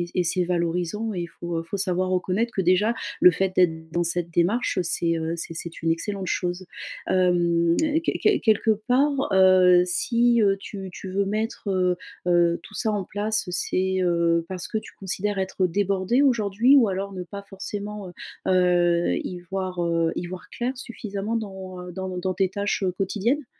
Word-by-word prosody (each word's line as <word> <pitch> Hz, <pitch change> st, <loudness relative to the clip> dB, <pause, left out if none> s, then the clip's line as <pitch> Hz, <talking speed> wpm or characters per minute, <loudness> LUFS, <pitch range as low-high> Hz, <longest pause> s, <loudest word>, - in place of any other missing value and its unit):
et -, -, -3 dB
c -, -, -17 dB
et 180 Hz, -, +2 dB
c'est 175 Hz, +2 st, +2 dB
valorisant 180 Hz, +5 st, -1 dB
et 175 Hz, -, -3 dB
il 170 Hz, -, -4 dB
faut, 170 Hz, 0 st, -6 dB
heu, -, -, -2 dB
faut 195 Hz, +4 st, -5 dB
savoir 185 Hz, -1 st, 0 dB
reconnaître 185 Hz, +5 st, 0 dB
que 190 Hz, -, -1 dB
déjà 185 Hz, +5 st, +3 dB, 0.3 s
le 180 Hz, -, +9 dB
fait 190 Hz, +2 st, -1 dB
d'être 160 Hz, -3 st, +1 dB
dans 175 Hz, -, +1 dB
cette 170 Hz, 0 st, -1 dB
démarche, 185 Hz, +7 st, +1 dB
c'est, 165 Hz, 0 st, +1 dB
heu, 160 Hz, +1 st, -2 dB
c'est 165 Hz, 0 st, -6 dB
c'est 170 Hz, +1 st, -6 dB
une 165 Hz, -, +1 dB
excellente 190 Hz, +3 st, -2 dB
chose. 180 Hz, +1 st, -2 dB, 0.4 s
Hem, 170 Hz, -2 st, +2 dB, 0.3 s
quel -, -, -1 dB
quel 420 Hz, -2 st, +3 dB
quelque 220 Hz, -1 st, +3 dB, 0.2 s
part, 275 Hz, -1 st, +2 dB
heu, 185 Hz, -1 st, +6 dB
si, 235 Hz, +5 st, +2 dB
heu, 195 Hz, -1 st, +3 dB
tu 195 Hz, -2 st, -7 dB
tu 190 Hz, -, -8 dB
veux 200 Hz, +1 st, +1 dB
mettre, 215 Hz, +1 st, -3 dB
heu 180 Hz, -1 st, +1 dB, 0.3 s
heu, 175 Hz, -1 st, +3 dB
tout -, -, -14 dB
ça 220 Hz, -2 st, 0 dB
en 200 Hz, -3 st, -2 dB
place, 210 Hz, 0 st, -1 dB
c'est, 185 Hz, +1 st, 0 dB
heu, 170 Hz, -1 st, +2 dB
parce 185 Hz, -2 st, -4 dB
que 220 Hz, -, -1 dB
tu -, -, -11 dB
considères 195 Hz, +1 st, -2 dB
être 190 Hz, 0 st, 0 dB
débordé 200 Hz, +6 st, +1 dB
aujourd'hui, 235 Hz, 0 st, +4 dB
ou 235 Hz, -6 st, +5 dB
alors 195 Hz, +1 st, -3 dB
ne 185 Hz, -, -5 dB
pas 200 Hz, +3 st, -8 dB
forcément, 200 Hz, 0 st, -6 dB
heu -, -, -10 dB, 0.4 s
heu, 175 Hz, -2 st, +3 dB
y 180 Hz, -, -5 dB
voir, 185 Hz, 0 st, -4 dB
heu, 165 Hz, -1 st, +1 dB
y 175 Hz, -, -3 dB
voir 185 Hz, +1 st, -8 dB
clair 250 Hz, +2 st, -3 dB
suffisamment 220 Hz, -3 st, -4 dB
dans, 190 Hz, -4 st, -6 dB
heu, 180 Hz, -, -8 dB
dans 190 Hz, +1 st, -5 dB
ne 180 Hz, -1 st, -4 dB
dans 185 Hz, 0 st, -2 dB
tes 190 Hz, 0 st, +1 dB
tâches, 200 Hz, +1 st, -2 dB
heu, 185 Hz, -, +1 dB
quotidiennes? 215 Hz, +9 st, -1 dB
185 Hz, 195 wpm, -24 LUFS, 175-205 Hz, 0.4 s, le